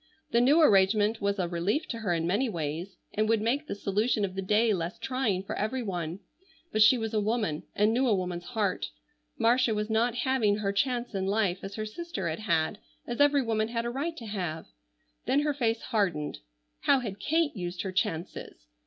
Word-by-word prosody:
The 235 Hz, -, +4 dB
new 280 Hz, +6 st, +5 dB
arrangement 210 Hz, -4 st, +4 dB
was 200 Hz, 0 st, 0 dB
a 180 Hz, -2 st, 0 dB
relief 180 Hz, -, -1 dB
to 230 Hz, -, -4 dB
her 205 Hz, -5 st, -1 dB
in 165 Hz, -1 st, 0 dB
many 210 Hz, +9 st, +1 dB
ways, 170 Hz, +1 st, -4 dB, 0.2 s
and 215 Hz, +1 st, +1 dB
would 225 Hz, -1 st, +4 dB
make 260 Hz, +8 st, 0 dB
the -, -, -3 dB
solution 205 Hz, +2 st, +1 dB
of 185 Hz, -, -6 dB
the 195 Hz, -, -3 dB
day 215 Hz, +3 st, +3 dB
less 170 Hz, -1 st, -3 dB
trying 240 Hz, -8 st, -1 dB
for -, -, -5 dB
every 240 Hz, +5 st, -1 dB
one. 175 Hz, -2 st, -4 dB, 0.5 s
But 215 Hz, -, +1 dB
she 215 Hz, +4 st, +7 dB
was 225 Hz, -1 st, -3 dB
a 215 Hz, -, +2 dB
woman 210 Hz, -8 st, -1 dB
and 210 Hz, +2 st, +3 dB
knew 255 Hz, +2 st, +2 dB
a 220 Hz, -, +4 dB
woman's 180 Hz, -2 st, -3 dB
heart. 200 Hz, -4 st, 0 dB, 0.5 s
Marcia 235 Hz, 0 st, +3 dB
was 210 Hz, +1 st, -2 dB
not 230 Hz, +2 st, +2 dB
having 245 Hz, -6 st, +2 dB
her 200 Hz, -2 st, -1 dB
chance 245 Hz, +3 st, 0 dB
in 190 Hz, -1 st, -1 dB
life 200 Hz, -3 st, +1 dB
as 195 Hz, +1 st, -7 dB
her 215 Hz, -, -3 dB
sister 215 Hz, -, -5 dB
had 160 Hz, +3 st, -3 dB
had, 170 Hz, -1 st, 0 dB, 0.3 s
as 240 Hz, +3 st, -2 dB
every 285 Hz, -1 st, +5 dB
woman 220 Hz, -2 st, 0 dB
had 230 Hz, 0 st, -2 dB
a 240 Hz, -, -1 dB
right 320 Hz, +6 st, -3 dB
to 230 Hz, -, -8 dB
have. 180 Hz, -7 st, -4 dB, 0.6 s
Then 280 Hz, -, +3 dB
her 295 Hz, 0 st, +1 dB
face 230 Hz, -4 st, 0 dB
hardened. 180 Hz, -10 st, -1 dB, 0.4 s
How 275 Hz, -2 st, +3 dB
had 205 Hz, -4 st, -5 dB
Kate 315 Hz, +4 st, +1 dB
used 175 Hz, -2 st, -4 dB
her 190 Hz, -, -3 dB
chances? 165 Hz, -, -3 dB
215 Hz, 205 wpm, -29 LUFS, 190-240 Hz, 0.6 s, she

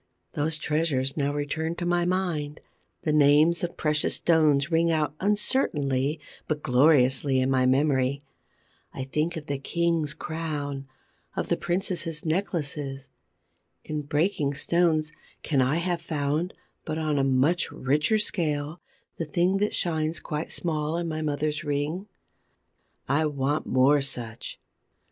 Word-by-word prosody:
Those 155 Hz, +2 st, -1 dB
treasures 150 Hz, -4 st, 0 dB
now 145 Hz, -2 st, 0 dB
return 150 Hz, +3 st, -2 dB
to 175 Hz, -, -4 dB
my 175 Hz, 0 st, +2 dB
mind: 175 Hz, -5 st, -1 dB, 0.4 s
the 155 Hz, -, +1 dB
names 150 Hz, +3 st, +5 dB
of 175 Hz, -, -3 dB
precious 150 Hz, -1 st, +1 dB
stones 155 Hz, -3 st, +3 dB
ring 165 Hz, +1 st, +3 dB
out 155 Hz, -3 st, +1 dB
uncertainly 155 Hz, -, 0 dB, 0.3 s
but 150 Hz, -1 st, -2 dB
gloriously 130 Hz, 0 st, +4 dB
in 130 Hz, +1 st, +1 dB
my 130 Hz, -1 st, +3 dB
memory. 135 Hz, 0 st, +2 dB, 0.7 s
I 135 Hz, -, -3 dB
think 150 Hz, +6 st, -1 dB
of 155 Hz, -, -7 dB
the 140 Hz, -2 st, -3 dB
king's 165 Hz, 0 st, 0 dB
crown, 145 Hz, -4 st, -4 dB, 0.5 s
of -, -, -2 dB
the -, -, +3 dB
princesses' 175 Hz, -3 st, -2 dB
necklaces. 150 Hz, -6 st, -2 dB, 0.7 s
In 150 Hz, -1 st, -3 dB
breaking 145 Hz, 0 st, 0 dB
stones, 160 Hz, -1 st, +1 dB, 0.3 s
can 140 Hz, -4 st, +2 dB
I 130 Hz, +4 st, +2 dB
have 170 Hz, 0 st, -1 dB
found, 155 Hz, +1 st, -1 dB, 0.3 s
but 155 Hz, -1 st, -3 dB
on 155 Hz, -2 st, 0 dB
a -, -, +2 dB
much 135 Hz, +6 st, +2 dB
richer 150 Hz, -, +1 dB
scale, 155 Hz, -6 st, -1 dB, 0.4 s
the 165 Hz, -, -2 dB
thing 175 Hz, +5 st, +1 dB
that 210 Hz, +1 st, 0 dB
shines 160 Hz, -1 st, 0 dB
quite 150 Hz, 0 st, -4 dB
small 155 Hz, -1 st, -1 dB
in 170 Hz, 0 st, -2 dB
my 155 Hz, -1 st, -3 dB
mother's 150 Hz, 0 st, -1 dB
ring? 150 Hz, +6 st, -2 dB, 1.0 s
I 155 Hz, +3 st, +2 dB
want 145 Hz, +1 st, -1 dB
more 135 Hz, +3 st, +4 dB
such. 120 Hz, -4 st, -5 dB
150 Hz, 135 wpm, -26 LUFS, 140-165 Hz, 1.0 s, names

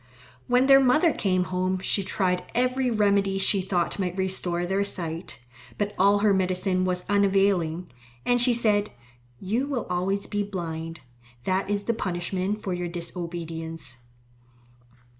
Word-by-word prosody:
When 250 Hz, +1 st, +4 dB
their 270 Hz, 0 st, +8 dB
mother 280 Hz, +5 st, +4 dB
came 185 Hz, -2 st, +1 dB
home 185 Hz, +1 st, -1 dB
she 190 Hz, +2 st, +1 dB
tried 185 Hz, -2 st, 0 dB
every 255 Hz, +1 st, +1 dB
remedy 200 Hz, -3 st, +2 dB
she 195 Hz, 0 st, +2 dB
thought 180 Hz, 0 st, -1 dB
might 180 Hz, -1 st, -2 dB
restore 185 Hz, -2 st, -1 dB
their 190 Hz, +2 st, 0 dB
sight. 170 Hz, -3 st, -3 dB, 0.4 s
But 205 Hz, 0 st, -1 dB
all 200 Hz, +2 st, +4 dB
her 205 Hz, -, +5 dB
medicine 185 Hz, 0 st, +1 dB
was 180 Hz, -1 st, -1 dB
unavailing, 195 Hz, -4 st, +2 dB, 0.3 s
and 245 Hz, 0 st, +3 dB
she 245 Hz, -1 st, +4 dB
said, 210 Hz, -3 st, +2 dB, 0.5 s
"You 230 Hz, +9 st, -1 dB
will 270 Hz, -5 st, -2 dB
always 195 Hz, +3 st, -1 dB
be 205 Hz, -, -2 dB
blind. 165 Hz, -4 st, -5 dB, 0.4 s
That 190 Hz, +4 st, 0 dB
is 205 Hz, 0 st, -1 dB
the 230 Hz, -, 0 dB
punishment 185 Hz, +1 st, -2 dB
for 190 Hz, -, -2 dB
your 175 Hz, 0 st, -3 dB
disobedience." 165 Hz, -4 st, -5 dB
190 Hz, 140 wpm, -26 LUFS, 180-205 Hz, 0.5 s, their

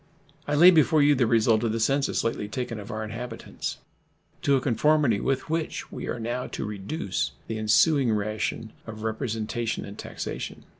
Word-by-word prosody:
I 145 Hz, -, +1 dB
lay 175 Hz, +5 st, +9 dB
before 155 Hz, -2 st, +4 dB
you 145 Hz, +1 st, +6 dB
the 125 Hz, -4 st, +2 dB
result 110 Hz, -1 st, +3 dB
of 115 Hz, -2 st, 0 dB
the 115 Hz, -, -1 dB
census 135 Hz, +5 st, +1 dB
lately 115 Hz, -2 st, -2 dB
taken 115 Hz, +1 st, -4 dB
of 100 Hz, -, -9 dB
our 110 Hz, 0 st, -3 dB
inhabitants, 115 Hz, +2 st, -5 dB, 0.6 s
to 140 Hz, -, +3 dB
a -, -, +3 dB
conformity 135 Hz, -2 st, +2 dB
with 135 Hz, +3 st, -1 dB
which 160 Hz, 0 st, -3 dB
we -, -, -6 dB
are 120 Hz, -, -3 dB
now 120 Hz, +2 st, -3 dB
to -, -, -5 dB
reduce 105 Hz, -, -3 dB
the 110 Hz, -1 st, -4 dB
ensuing 125 Hz, +4 st, +4 dB
ration 110 Hz, +1 st, -2 dB
of 110 Hz, -1 st, -7 dB
representation 110 Hz, 0 st, -2 dB
and 100 Hz, -, -10 dB
taxation. -, -, -6 dB
115 Hz, 170 wpm, -26 LUFS, 110-140 Hz, 0.6 s, lay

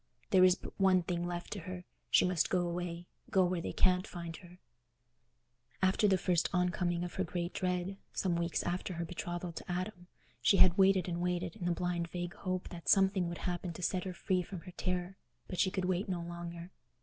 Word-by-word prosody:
There 185 Hz, -2 st, +7 dB
is 185 Hz, -1 st, +7 dB
but -, -, -10 dB
one 185 Hz, -2 st, +5 dB
thing 175 Hz, 0 st, -2 dB
left 175 Hz, 0 st, -5 dB
to 205 Hz, -, -5 dB
her: 180 Hz, +1 st, -7 dB, 0.2 s
she -, -, +5 dB
must 180 Hz, -2 st, +2 dB
go 180 Hz, -2 st, +1 dB
away, 175 Hz, 0 st, -4 dB, 0.2 s
go 190 Hz, -1 st, +4 dB
where 180 Hz, -1 st, 0 dB
they -, -, -3 dB
can't 185 Hz, +2 st, +3 dB
find 170 Hz, -2 st, -6 dB
her. 180 Hz, 0 st, -14 dB, 1.2 s
After 190 Hz, +3 st, +3 dB
the 190 Hz, -2 st, +4 dB
first 175 Hz, -2 st, +1 dB
on 180 Hz, -1 st, +2 dB
coming 175 Hz, -1 st, -1 dB
of 175 Hz, -, -5 dB
her 190 Hz, -, 0 dB
great 175 Hz, -1 st, -3 dB
dread, 180 Hz, +1 st, -1 dB
some 180 Hz, -3 st, 0 dB
weeks 170 Hz, 0 st, 0 dB
after 180 Hz, +1 st, -2 dB
her 170 Hz, 0 st, -2 dB
betrothal 175 Hz, +1 st, -4 dB
to 170 Hz, -, -7 dB
Adam, 180 Hz, 0 st, -4 dB, 0.3 s
she 195 Hz, -, +5 dB
had 180 Hz, -2 st, +7 dB
waited 190 Hz, -2 st, +4 dB
and 175 Hz, -1 st, -2 dB
waited, 180 Hz, -1 st, -1 dB
in 195 Hz, -5 st, -6 dB
the 175 Hz, -, +2 dB
blind 175 Hz, 0 st, -1 dB
vague 175 Hz, +1 st, -4 dB
hope 185 Hz, -1 st, -3 dB
that 170 Hz, -2 st, -6 dB
something 190 Hz, -3 st, +4 dB
would 170 Hz, -, -6 dB
happen 175 Hz, -1 st, -2 dB
to 175 Hz, -, -8 dB
set 180 Hz, +3 st, 0 dB
her 185 Hz, -, -3 dB
free 185 Hz, 0 st, +1 dB
from 180 Hz, 0 st, -7 dB
her 180 Hz, -, -10 dB
terror; 180 Hz, +1 st, -2 dB, 0.3 s
but 180 Hz, -, -5 dB
she 190 Hz, -, +4 dB
could 190 Hz, -1 st, -2 dB
wait 185 Hz, +2 st, 0 dB
no 175 Hz, -2 st, -2 dB
longer. 170 Hz, +1 st, -7 dB
180 Hz, 215 wpm, -33 LUFS, 175-185 Hz, 1.2 s, There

